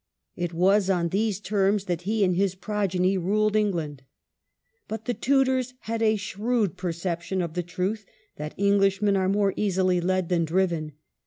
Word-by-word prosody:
It 175 -1 -3
was 190 +3 +3
on 175 -3 +1
these 205 +1 0
terms 200 -1 +1
that 175 -3 -2
he 215 -1 +2
and 180 -2 +2
his 190 0 +1
progeny 190 -2 0
ruled 210 +4 +1
Eng 210 -1 +3
land. 150 -5 -4 0.9
But 220 - -6
the 245 - 0
Tudors 260 -1 +1
had 225 0 -3
a 220 -1 +3
shrewd 210 0 -1
perception 175 0 -3
of 170 -3 -2
the 175 - -1
truth 185 +4 -3 0.3
that 150 +1 -6
Englishmen 200 0 +3
are 190 -1 +1
more 200 -1 +2
easily 185 -3 +1
led 185 0 0
than 175 -2 +2
driven. 165 -2 0
190 Hz, 165 wpm, -26 LUFS, 175-210 Hz, 0.9 s, was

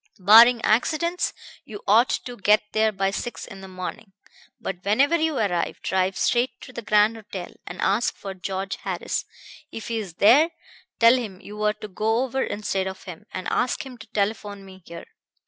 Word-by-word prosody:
Barring 230 +5 +7
accidents, 325 +10 +1 0.3
you 205 -2 -10
ought 225 +5 +5
to 245 - -3
get 210 0 +3
there 220 0 +2
by 195 -1 -1
six 240 +4 -5
in 195 -3 -11
the 190 - -9
morning. 185 +2 -7 0.5
But 180 -1 -6
whenever 270 +11 +3
you 320 -3 0
arrive, 180 -6 -1
drive 190 0 0
straight 245 +1 +1
to 255 - -11
the 235 - -6
Grand 215 +1 +3
Hotel 195 -4 -8
and 180 - -8
ask 205 +5 +1
for 195 -1 -7
George 190 +1 -4
Harris. - - -3 0.5
If 225 - -7
he's 215 -7 -4
there, 265 - +6 0.5
tell 230 +1 +7
him 210 -7 -6
you 210 +2 -9
are 210 0 +2
to 215 0 -9
go 220 +5 0
over 265 +1 -2
instead 195 -4 -2
of 190 - -7
him, 175 -4 -10
and 185 - -5
ask 250 - 0
him 260 -2 -9
to 225 - -12
telephone 205 -1 -3
me 190 0 -14
here. 170 0 -9
210 Hz, 180 wpm, -24 LUFS, 195-235 Hz, 0.5 s, Barring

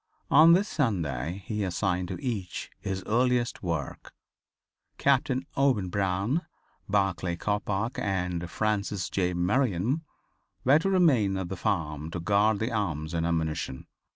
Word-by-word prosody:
On 160 +3 +8
this 195 +4 +3
Sunday 90 - -1
he 105 +1 -2
assigned 90 -1 -1
to - - -5
each 110 - -4
his 95 -1 -4
earliest 120 +1 +1
work. 85 -6 -4 0.8
Captain 135 -1 +2
Owen 130 -9 +2
Brown, 100 - 0 0.5
Barclay 95 -3 +1
Coppoc 105 +4 -2
and 90 -3 -2
Francis 100 -3 -1
J. 90 -2 0
Merriam 110 - +1 0.6
were 140 +4 +5
to 195 - 0
remain 135 - +3
at 95 -2 -4
the 95 - -3
farm 80 -4 -2
to 85 - -4
guard 105 +4 +3
the 110 +4 -2
arms 80 -8 -2
and 85 0 0
ammunition. 80 -5 -2
100 Hz, 130 wpm, -28 LUFS, 85-120 Hz, 0.8 s, On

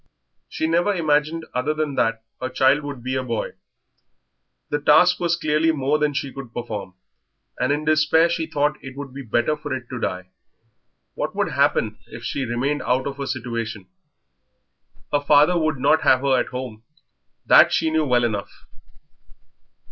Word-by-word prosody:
She - - -2
never 175 +5 +1
imagined 155 0 0
other 140 +5 -1
than 155 -2 -2
that 115 -3 0 0.2
her 130 - -2
child 130 +3 +3
would 140 -4 -7
be 130 +1 -3
a 130 - 0
boy. 115 -3 -3 1.2
The 145 - -1
task 180 +5 +5
was 170 -1 +1
clearly 155 0 +1
more 145 0 0
than 150 -1 0
she 140 -1 -3
could 135 -4 -9
perform, 105 -6 -5 0.6
and 125 +2 +1
in 150 +1 -1
despair 155 +2 +4
she 165 -1 -2
thought 150 -1 -1
it 135 0 -9
would 140 -2 -7
be 140 - -7
better 120 +4 0
for 150 -1 -8
it 125 -2 -8
to 125 - -5
die. 90 -3 -4 0.8
What - - -4
would - - 0
happen - - +1
if - - -10
she 135 - -2
remained 130 +5 -1
out 125 +2 0
of 140 0 -5
a 140 - -3
situation? 115 -5 -4 1.2
Her 145 - +2
father 150 +4 +4
would 155 -3 0
not 155 +5 +3
have 130 - +4
her 135 -1 +2
at - - -1
home, 125 -4 -6 0.6
that - - +7
she 160 - +1
knew 160 0 +2
well 125 -4 +2
enough. 105 -4 -4
140 Hz, 170 wpm, -22 LUFS, 125-155 Hz, 1.2 s, that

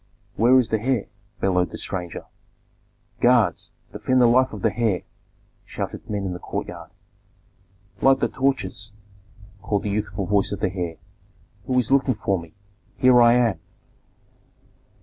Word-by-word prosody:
"Where 120 +4 +5
is 125 -3 +2
the 110 -1 0
heir?" 125 -3 0 0.4
bellowed 90 -2 +1
the - - -8
stranger. 90 -3 -4 0.9
"Guards! 120 -3 +2 0.2
Defend 130 0 +1
the 125 - +6
life 130 +2 +4
of 105 -3 -8
the - - +1
heir!" 110 -7 0 0.6
shouted - - -6
men 100 -2 -2
in 90 - -3
the 90 - -7
courtyard. - - -6 1.1
"Light 135 0 +5
the - - +1
torches!" 130 -5 -2 0.7
called 105 -2 -1
the 105 - -2
youthful 100 -1 -3
voice 100 +1 +1
of 100 - -4
the 95 -3 -1
heir. 90 -4 -3 0.7
"Who 130 - 0
is 125 0 +1
looking 135 -2 +3
for 100 -3 -1
me? 85 -1 -13 0.4
Here 125 -2 +5
I 120 0 +6
am!" 120 -8 +2
110 Hz, 150 wpm, -23 LUFS, 95-125 Hz, 1.1 s, the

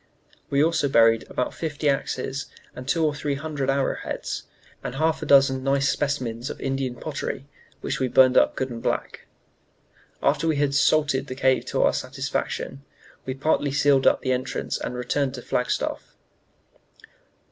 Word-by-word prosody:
We 140 +1 +3
also 160 -3 +1
buried 115 -2 +4
about 125 - -2
fifty 150 -2 -3
axes 135 0 -1 0.3
and 125 +1 -8
two 160 +3 +2
or 150 - +1
three 145 -1 -2
hundred 140 -2 -3
arrow 135 0 +1
heads, - - -5 0.4
and 125 - -5
half 160 +2 +1
a - - -4
dozen 135 -2 +5
nice 140 0 +2
specimens 130 -4 -2
of - - -7
Indian 135 -2 -2
pottery, 135 0 -5 0.4
which 135 - -2
we 130 - +1
burned 130 +1 +5
up - - +4
good 130 -1 -2
and 115 -1 -6
black. - - -3 1.0
"After 165 - +2
we 160 - +2
had 145 -1 +1
'salted' 140 -1 +2
the 130 - -5
cave 130 0 +2
to - - 0
our - - +3
satisfaction, 135 - -3 0.4
we 130 - -2
partly 145 0 +1
sealed 140 -1 +3
up - - +4
the 130 - -1
entrance 125 0 -3
and 125 - -4
returned 130 +2 -1
to 125 - -8
Flagstaff." 125 - -2
135 Hz, 165 wpm, -24 LUFS, 130-145 Hz, 1.0 s, dozen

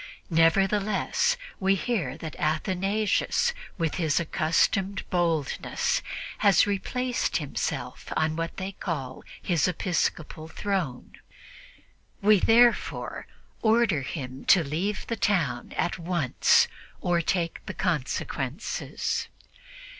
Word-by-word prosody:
Nevertheless, 195 - +2 0.2
we 195 0 +3
hear 180 - -2
that 160 -2 -7
Athanasius, 195 - +1 0.2
with 165 -4 0
his 155 -3 +2
accustomed 170 +4 +1
boldness, 165 -5 0 0.4
has 200 -4 +5
replaced 245 +5 -1
himself 145 -4 -4
on 155 0 +1
what 165 0 -4
they 190 +1 -3
call 140 -9 -5 0.2
his 170 -2 +1
'episcopal 170 -3 -1
throne.' 170 -7 -3 1.0
We 210 -1 +5
therefore 235 +4 +3 0.3
order 220 -8 +3
him 130 -1 -6
to 180 - +6
leave 180 +8 -2
the 230 - -2
town 165 - 0
at 175 - 0
once 170 -6 +3 0.3
or 175 -1 +1
take 170 0 -1
the - - -5
consequences." 145 - -2
175 Hz, 100 wpm, -27 LUFS, 155-200 Hz, 1.0 s, to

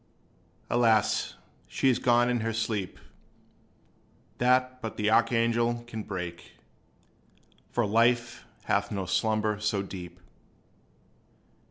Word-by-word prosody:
Alas! 115 -3 +2 0.3
she - - 0
is 125 -2 +3
gone 120 -1 +3
in 125 -1 +1
the 115 +1 -1
sleep 110 -4 -2 1.4
That 130 +1 +2
but 110 - -6
the 105 0 +1
archangel 115 0 +2
can 110 -2 -6
break; 90 -4 -7 1.2
For 120 - 0
life 120 +2 +1 0.2
hath 100 0 0
no 100 -2 -3
slumber 110 +2 0
so 105 -2 -1
deep. 90 -2 -9
115 Hz, 105 wpm, -28 LUFS, 105-120 Hz, 1.4 s, is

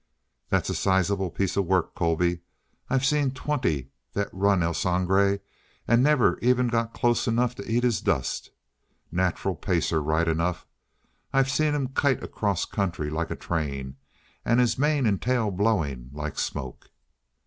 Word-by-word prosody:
"That's - - +1
a - - -1
sizable 95 0 +1
piece 95 +2 -1
of 100 -3 0
work, 95 -2 +1
Colby. 85 +1 +1 0.5
I've 135 0 +1
seen 145 -1 +2
twenty 125 - -2 0.2
that 100 0 -2
run 95 -1 +2
El 85 0 0
Sangre, 95 +3 +2 0.5
and 120 +1 +4
never 145 -2 +3
even 125 0 +2
got 115 -1 -1
close 120 +1 +1
enough 120 +1 +1
to 110 -2 -7
eat 120 +1 +2
his 120 -3 +1
dust. 65 - -1 0.6
Nacheral 90 +2 0
pacer, 80 0 0
right 80 +3 +1
enough. 85 +2 -1 0.7
I've 135 0 +2
seen 150 +3 +2
him 135 -3 -1
kite 135 -1 +1
across 100 -5 -1
country 85 -7 -2
like 80 +1 -2
a - - -3
train! 70 -5 -3 0.5
And 120 - +3
his 125 -2 +3
mane 145 -1 +1
and 100 -4 +1
tail 120 -4 +1
blowing 85 - 0
like 75 0 -5
smoke!" 65 -3 -5
100 Hz, 155 wpm, -26 LUFS, 85-125 Hz, 0.7 s, and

